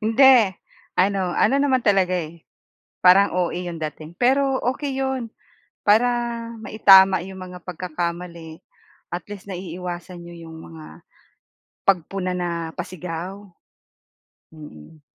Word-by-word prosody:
Hindi. 230 Hz, -2 st, +6 dB, 0.4 s
Ano 190 Hz, -1 st, +1 dB
ano -, -, +3 dB
naman 265 Hz, -3 st, +1 dB
talaga, 190 Hz, -3 st, +3 dB
eh, 165 Hz, -1 st, -6 dB, 0.6 s
parang 190 Hz, +2 st, +6 dB
OA 180 Hz, -2 st, 0 dB
'yung 175 Hz, -2 st, -5 dB
dating. 155 Hz, 0 st, -6 dB
Pero 270 Hz, +1 st, +2 dB, 0.2 s
okey 285 Hz, -1 st, -4 dB
'yon 265 Hz, -4 st, -2 dB, 0.5 s
para 220 Hz, +4 st, +5 dB, 0.5 s
maitama 195 Hz, -4 st, +6 dB
'yung 190 Hz, 0 st, -9 dB
mga 180 Hz, -1 st, -9 dB
pagkakamali. 170 Hz, -1 st, -5 dB, 0.5 s
At 175 Hz, -1 st, -4 dB
least, 200 Hz, -1 st, -9 dB
naiiwasan 180 Hz, -1 st, -6 dB
niyo 170 Hz, -1 st, -11 dB
'yung 160 Hz, -, -10 dB
mga 160 Hz, -1 st, -13 dB, 0.8 s
pagpuna 185 Hz, 0 st, +1 dB
na 175 Hz, -1 st, -2 dB, 0.3 s
pasigaw. 180 Hz, +2 st, -6 dB, 1.1 s
Mm. 150 Hz, -, -13 dB
180 Hz, 110 wpm, -22 LUFS, 170-205 Hz, 1.1 s, Hindi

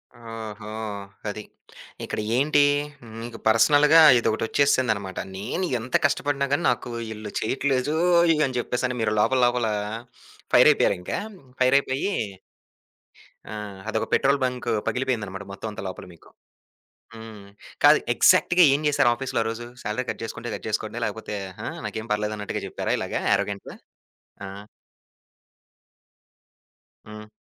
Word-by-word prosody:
ఓహో! 115 Hz, -2 st, -8 dB, 0.6 s
అది. 105 Hz, +1 st, -5 dB, 0.6 s
ఇక్కడ -, -, -4 dB, 0.2 s
ఏంటి 145 Hz, +3 st, +3 dB, 0.6 s
మీకు 115 Hz, 0 st, -7 dB
పర్సనల్‌గా 145 Hz, +8 st, +6 dB, 0.2 s
ఇదొకటొచ్చేసిందనమాట. 115 Hz, -3 st, +1 dB, 0.2 s
నేను 115 Hz, -, -3 dB
ఎంత 120 Hz, +3 st, -5 dB
కష్టపడిన 145 Hz, 0 st, 0 dB
గాని, 145 Hz, -, +1 dB
నాకు 125 Hz, -, -4 dB, 0.2 s
ఈళ్ళు 105 Hz, -1 st, -7 dB
చెయ్యట్లేదోయ్ 155 Hz, +7 st, +2 dB
అని 130 Hz, -1 st, -4 dB
చెప్పేసి 125 Hz, +1 st, -2 dB
అని 125 Hz, -, -4 dB
మీరు 110 Hz, -, +1 dB
లోపల, 130 Hz, +5 st, +3 dB
లోపల 120 Hz, -1 st, +1 dB, 0.9 s
ఫైరైయిపోయారు -, -, +5 dB
ఇంకా. 90 Hz, -, -3 dB, 0.4 s
ఫైరైయిపోయి 135 Hz, +6 st, +2 dB, 1.3 s
ఆ! -, -, -8 dB, 0.4 s
అదొక 110 Hz, 0 st, -1 dB
పెట్రోల్ 140 Hz, +1 st, +3 dB
బంక్ 125 Hz, -1 st, -2 dB, 0.2 s
పగిలిపోయిందనమాట 110 Hz, -7 st, -2 dB
మొత్తం 100 Hz, +3 st, -6 dB
అంతా 105 Hz, -, -8 dB
లోపల 95 Hz, -, -7 dB
మీకు. 85 Hz, -, -20 dB, 0.9 s
హ్మ్. 110 Hz, -2 st, -11 dB, 0.4 s
కాదు -, -, +7 dB, 0.2 s
ఎగ్జాక్ట్‌గా 180 Hz, 0 st, +5 dB
ఏం 140 Hz, -, 0 dB
చేసారు 145 Hz, -4 st, +3 dB
ఆఫీస్‌లో 135 Hz, 0 st, -2 dB
ఆరోజు? 115 Hz, +1 st, -4 dB, 0.2 s
సాలరీ 105 Hz, +5 st, -2 dB
కట్ -, -, -4 dB
చేసుకుంటే, 115 Hz, -, -6 dB
కట్ -, -, -7 dB
చేసుకోండి. -, -, -3 dB
లేకపోతే, -, -, -4 dB, 0.3 s
ఆ! -, -, -4 dB, 0.2 s
నాకేం 110 Hz, +1 st, -6 dB
పర్లేదు 105 Hz, 0 st, -1 dB
అన్నట్టుగా 105 Hz, -1 st, -4 dB
చెప్పారా -, -, -2 dB
ఇలాగ, -, -, -5 dB, 0.2 s
యారగెంట్‌గా? 100 Hz, -1 st, -3 dB, 0.7 s
ఆ! -, -, -6 dB, 2.6 s
హ్మ్. 105 Hz, 0 st, -10 dB
120 Hz, 120 wpm, -24 LUFS, 110-140 Hz, 2.6 s, కాదు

